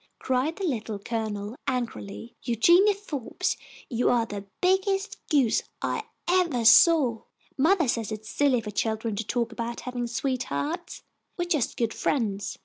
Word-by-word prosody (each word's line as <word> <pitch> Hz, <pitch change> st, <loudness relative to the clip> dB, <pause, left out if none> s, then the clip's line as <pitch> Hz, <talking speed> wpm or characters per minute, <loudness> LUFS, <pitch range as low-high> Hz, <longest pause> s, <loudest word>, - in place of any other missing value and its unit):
cried 260 Hz, +5 st, 0 dB
the 395 Hz, -, -6 dB
Little 225 Hz, -, -2 dB
Colonel, 215 Hz, 0 st, -4 dB
angrily. 235 Hz, -3 st, -4 dB
"Eugenia 345 Hz, -, +4 dB
Forbes, 300 Hz, -, -3 dB, 0.3 s
you 240 Hz, 0 st, +1 dB
are 235 Hz, -2 st, +3 dB
the 200 Hz, -2 st, -7 dB
biggest 385 Hz, +2 st, +1 dB
goose 270 Hz, -7 st, +3 dB, 0.2 s
I 450 Hz, -, -2 dB, 0.2 s
evah 345 Hz, -10 st, +2 dB
saw! 260 Hz, -4 st, +6 dB, 0.3 s
Mothah 325 Hz, +3 st, +3 dB
says 230 Hz, -2 st, -1 dB
it's 215 Hz, 0 st, -6 dB
silly 265 Hz, -1 st, +2 dB
for 210 Hz, -1 st, -6 dB
children 220 Hz, +1 st, -1 dB
to 225 Hz, -, -1 dB
talk 235 Hz, +1 st, -1 dB
about 235 Hz, +1 st, -4 dB
havin' 245 Hz, -1 st, -3 dB
sweethea'ts. 275 Hz, +7 st, -3 dB, 0.3 s
We 350 Hz, -, 0 dB
are -, -, -12 dB
just 300 Hz, -8 st, 0 dB
good 230 Hz, -2 st, 0 dB
friends." 205 Hz, -7 st, -1 dB
245 Hz, 145 wpm, -26 LUFS, 225-325 Hz, 0.3 s, saw